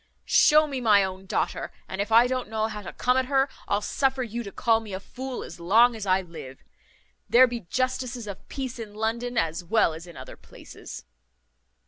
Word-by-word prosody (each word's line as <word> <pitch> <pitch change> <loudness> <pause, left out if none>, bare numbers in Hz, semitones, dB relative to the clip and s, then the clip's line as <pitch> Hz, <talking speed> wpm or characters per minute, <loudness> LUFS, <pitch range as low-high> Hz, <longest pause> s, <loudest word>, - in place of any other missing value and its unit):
Shew 305 0 +5
me 270 -3 -4
my 210 -4 +5
own 190 0 -6
daughter, - - -2 0.2
and 190 - -3
if 205 +2 -4
I 230 +2 +7
don't 255 -3 -2
know 220 -1 -1
how 210 -1 -5
to 195 - -8
come 250 +1 +1
at 260 -1 +1
her, 270 0 +2 0.2
I'll 205 +1 0
suffer 265 +3 0
you 235 0 -4
to 200 -4 -7
call 225 +1 +2
me 215 -3 -9
a 190 - -3
fool 260 +5 -7
as 170 - -10
long 225 +8 +4
as 210 -3 -6
I 185 +1 +3
live. 150 -7 -11 0.7
There 250 +2 +7
be 235 -7 -6
justices 255 -2 -2
of 200 -2 -9
peace 260 -3 -5
in 210 -2 -8
London, 235 +3 -2
as 165 -2 0
well 190 -1 +2
as 165 +2 -9
in 170 - -12
other - - -9
places." - - -12
225 Hz, 205 wpm, -26 LUFS, 195-250 Hz, 0.7 s, I